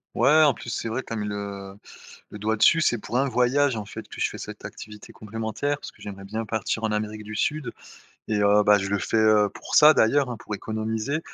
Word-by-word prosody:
Ouais, 155 Hz, +2 st, +5 dB
en 145 Hz, -3 st, +5 dB
plus, 120 Hz, -, -9 dB
c'est 115 Hz, -, -3 dB
vrai, 125 Hz, +4 st, -3 dB
tu -, -, -5 dB
as -, -, -2 dB
mis 105 Hz, -2 st, -3 dB
le 100 Hz, -1 st, -6 dB, 0.6 s
le 105 Hz, -, -9 dB
doigt 110 Hz, +2 st, 0 dB
dessus. 165 Hz, +9 st, +5 dB
C'est 120 Hz, -6 st, +2 dB
pour 120 Hz, +3 st, -3 dB
un 135 Hz, +1 st, +1 dB
voyage, 130 Hz, +2 st, +2 dB
en 110 Hz, -2 st, -4 dB
fait, -, -, -9 dB
que -, -, -10 dB
je -, -, +1 dB
fais -, -, -9 dB
cette -, -, -9 dB
activité 110 Hz, +2 st, -10 dB
complémentaire, 115 Hz, +6 st, -3 dB
parce -, -, -9 dB
que -, -, -25 dB
j'aimerais 100 Hz, -1 st, -8 dB
bien 110 Hz, +3 st, -4 dB
partir 110 Hz, +1 st, -3 dB
en 110 Hz, -, 0 dB
Amérique 105 Hz, 0 st, -3 dB
du 110 Hz, +1 st, -8 dB
Sud 150 Hz, +6 st, -1 dB, 0.6 s
et 105 Hz, -1 st, 0 dB
heu, 105 Hz, +1 st, +5 dB
bah, 105 Hz, 0 st, +6 dB
je 95 Hz, -1 st, -3 dB
le 100 Hz, 0 st, 0 dB
fais, -, -, -3 dB
heu, 110 Hz, -1 st, +4 dB
pour -, -, -5 dB
ça 150 Hz, +1 st, +8 dB
d'ailleurs, 135 Hz, +3 st, +3 dB
hein, 120 Hz, -, -4 dB
pour 105 Hz, -, -8 dB
économiser 110 Hz, +6 st, -3 dB
110 Hz, 245 wpm, -25 LUFS, 105-125 Hz, 0.6 s, ça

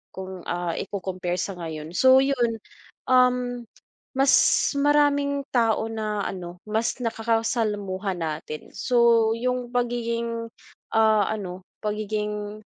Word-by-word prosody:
kung, 190 Hz, -1 st, -7 dB
ah, 175 Hz, -1 st, -1 dB
ico-compare 185 Hz, -3 st, -3 dB
sa 195 Hz, -, -2 dB
ngayon, 160 Hz, -1 st, -6 dB
so 260 Hz, +7 st, +6 dB
yun, 245 Hz, -4 st, +1 dB, 0.6 s
um, 250 Hz, -1 st, +3 dB, 0.5 s
mas 270 Hz, 0 st, +4 dB, 0.5 s
maraming 285 Hz, -1 st, +3 dB
tao 225 Hz, -2 st, +2 dB
na 215 Hz, -2 st, -2 dB
ano 175 Hz, -1 st, -6 dB
mas 220 Hz, +2 st, 0 dB
nakakasalamuha 220 Hz, -4 st, -1 dB
natin 155 Hz, -2 st, -5 dB
so 230 Hz, 0 st, +4 dB
yung 250 Hz, 0 st, -1 dB
pagiging, 235 Hz, -1 st, -1 dB, 0.5 s
ah, 220 Hz, -2 st, +4 dB
ano 190 Hz, -3 st, -5 dB, 0.2 s
pagiging 210 Hz, 0 st, -3 dB
220 Hz, 105 wpm, -25 LUFS, 190-245 Hz, 0.6 s, so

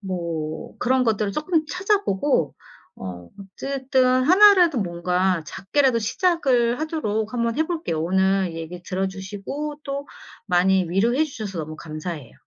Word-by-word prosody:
뭐 170 Hz, +1 st, -4 dB
그런 255 Hz, +1 st, +2 dB
것들을 215 Hz, -3 st, 0 dB
조금 310 Hz, -, 0 dB
찾아보고 335 Hz, -, 0 dB, 0.4 s
어 90 Hz, -2 st, -8 dB
어쨌든 260 Hz, +7 st, -1 dB, 0.2 s
하나라도 365 Hz, -4 st, +6 dB
뭔가 180 Hz, -1 st, 0 dB
작게라도 255 Hz, -, +1 dB
시작을 245 Hz, -, +1 dB
하도록 220 Hz, -10 st, -2 dB
한번 235 Hz, -1 st, -1 dB
해 315 Hz, -, +2 dB
볼게요. 315 Hz, -, -2 dB
오늘 190 Hz, 0 st, +1 dB
얘기 165 Hz, +2 st, -7 dB
들어 190 Hz, +1 st, -2 dB
주시고 205 Hz, +11 st, -6 dB
또 280 Hz, +1 st, -4 dB, 0.4 s
많이 185 Hz, 0 st, +3 dB
위로해 235 Hz, -, +2 dB
주셔서 215 Hz, -, -6 dB
너무 155 Hz, 0 st, -7 dB
감사해요. 155 Hz, -4 st, -7 dB
210 Hz, 300 characters per minute, -23 LUFS, 180-280 Hz, 0.4 s, 하나라도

